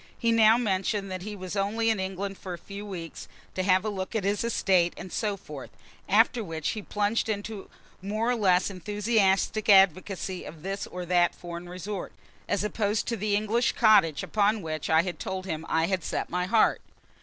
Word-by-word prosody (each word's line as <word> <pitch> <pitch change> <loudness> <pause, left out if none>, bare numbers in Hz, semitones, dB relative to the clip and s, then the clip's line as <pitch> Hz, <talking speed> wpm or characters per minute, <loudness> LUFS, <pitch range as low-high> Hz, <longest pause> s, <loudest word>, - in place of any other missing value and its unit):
He 230 -1 +1
now 225 0 +6
mentioned 195 -3 -1
that 185 -1 -4
he 210 +2 -6
was 185 0 -6
only 220 +3 +1
in 220 - -1
England 190 +1 -4
for 185 -2 -6
a - - -11
few 200 +4 -9
weeks, 170 -4 -7 0.3
to 185 - -1
have 185 +1 +3
a - - 0
look 190 +1 -5
at 220 - 0
his 200 +2 0
estate, 185 -6 +2
and 185 - -8
so 210 -3 -1
forth; 150 -7 -9 0.4
after 225 +3 +4
which 160 -4 -3
he 215 - -3
plunged 210 +2 -1
into 205 -1 -4 0.3
more 215 +5 -1
or - - +1
less 190 -3 +2
enthusiastic 205 +2 +1
advocacy 190 -1 +3
of 155 0 -10
this 195 +1 -4
or 180 0 -6
that 175 0 +2
foreign 175 0 -8
resort, 185 +2 -6 0.4
as 205 - +1
opposed 210 0 -1
to 235 - 0
the 210 -1 0
English 215 +3 +1
cottage 200 - +4
upon 210 0 +1
which 155 -2 -4
I 160 +1 +5
told 190 +1 -5
him 160 -3 -4
I 160 0 +2
had 185 -1 -1
set - - -3
my 180 +1 0
heart. 220 +2 +3
195 Hz, 190 wpm, -27 LUFS, 180-215 Hz, 0.4 s, now